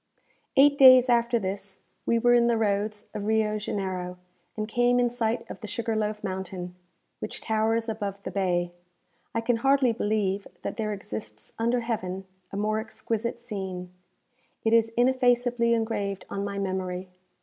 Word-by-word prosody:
Eight 285 +1 +6
days 255 -1 +9
after 235 0 +3
this 195 -1 -5 0.3
we 235 - +3
were 240 +1 +4
in 240 -1 +5
the 235 -1 +3
roads 210 0 0
of 205 - -4
Rio 215 -1 +1
Janeiro, 185 -3 -3 0.4
and 215 0 -2
came 245 +2 +3
in 245 -1 +2
sight 230 -1 -1
of - - -8
the 215 - -6
Sugar 225 +1 -2
loaf 215 0 -2
Mountain, 185 -1 -4 0.5
which - - -5
towers 225 +1 0
above 200 -3 -4
the - - -5
bay. 175 -3 0 0.6
I 230 - +1
can 230 0 +1
hardly 270 0 +3
believe 205 -3 -1 0.2
that - - -4
there 215 -2 -1
exists 110 - -7
under 235 +2 +1
heaven 190 -5 -3 0.3
a 195 - -5
more 215 +1 0
exquisite 225 +1 -3
scene. 190 -6 -5 0.7
It 225 - +3
is 230 -1 +5
ineffaceably 245 -2 +3
engraved 205 -4 -2
on 200 - -2
my 200 0 -4
memory. 185 -1 -2
215 Hz, 160 wpm, -27 LUFS, 195-235 Hz, 0.7 s, days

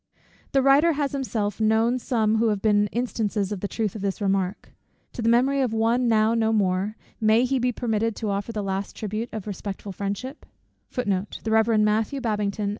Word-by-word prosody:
The 270 -1 +3
writer 285 +5 +5
has 285 -1 -1
himself 225 -7 -2
known 225 +3 +2
some 225 -3 +1
who 230 +1 +2
have 210 -2 +1
been 205 0 +3
instances 215 -3 -2
of 205 - -3
the 200 - -3
truth 215 -1 -2
of 215 - -7
this 195 +1 -2
remark. 195 -2 -1 0.4
To - - -5
the 230 - +2
memory 265 +4 +3
of 250 -4 0
one, 230 +3 +2
now 220 0 +3
no 225 -1 +2
more, 200 0 0 0.2
may 220 +2 +4
he 265 +1 0
be 250 +1 +1
permitted 225 -2 -1
to 215 -3 -3
offer 200 +3 -3
the 210 -2 -3
last 195 0 -3
tribute 215 +2 -4
of 220 -3 -6
respectful 200 0 -6
friendship? 205 - -5
220 Hz, 170 wpm, -24 LUFS, 205-240 Hz, 0.4 s, writer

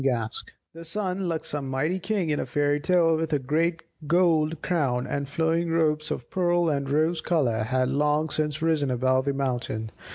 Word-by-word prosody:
Gask 120 -4 -1 0.3
The 165 +1 -10
sun, 185 +1 -2
like 160 -1 -2
some 145 -2 -4
mighty 155 +8 0
king 185 -3 -1
in 145 - 0
a - - -3
fairy 145 +3 +1
tale 165 0 +3
with 160 -1 -2
a - - +4
great 165 +5 0 0.2
gold 165 -2 +2
crown, 135 -8 0
and 140 -1 -3
flowing 165 +3 0
robes 155 -2 +1
of 120 - -4
pearl 175 -2 +2
and 140 -2 -1
rose 155 +3 +1
colour, 135 -11 +1
had 130 +3 0
long 150 +2 +1
since 155 0 -1
risen 155 -4 +1
above 130 +1 +1
the 140 - 0
mountain. 120 -5 -2
150 Hz, 185 wpm, -26 LUFS, 135-165 Hz, 0.3 s, a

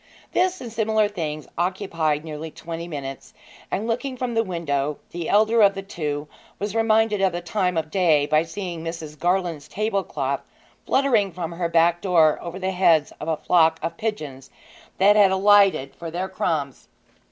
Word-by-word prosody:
This 370 0 +1
and 235 -3 -7
similar 220 -1 +2
things 155 -7 -5
occupied 170 -4 -1
nearly 155 0 -6
twenty 165 +2 -7
minutes, 135 -4 -7 0.3
and, 210 - -2
looking 255 +3 -2
from 250 -1 -3
the 225 0 +2
window, 150 -6 -2
the 170 -1 -4
elder 220 +2 +4
of 200 -1 +5
the 195 - -5
two 150 -6 -4 0.3
was 205 0 -3
reminded 220 -2 +2
of 190 -2 +2
the 175 - -2
time 180 0 -1
of 155 -1 -2
day 160 -6 +3
by 155 +1 +3
seeing 170 0 -6
Mrs. 160 -3 -7
Garland's 175 -4 0
table 205 +2 -1
cloth 140 -4 -2 0.5
fluttering 235 -8 +2
from 170 -1 -5
her 170 0 -2
back 170 +1 +3
door 165 -5 +3
over 175 +1 -6
the 190 0 -2
heads 170 -5 +3
of 150 - -6
a 160 -1 0
flock 160 -1 +3
of 165 0 -3
pigeons 155 - -5 0.5
that 205 +2 +5
had 205 -2 +6
alighted 190 -7 +4
for 170 - -7
the 180 +3 -3
crumbs. 145 -8 -3
175 Hz, 175 wpm, -23 LUFS, 155-205 Hz, 0.5 s, had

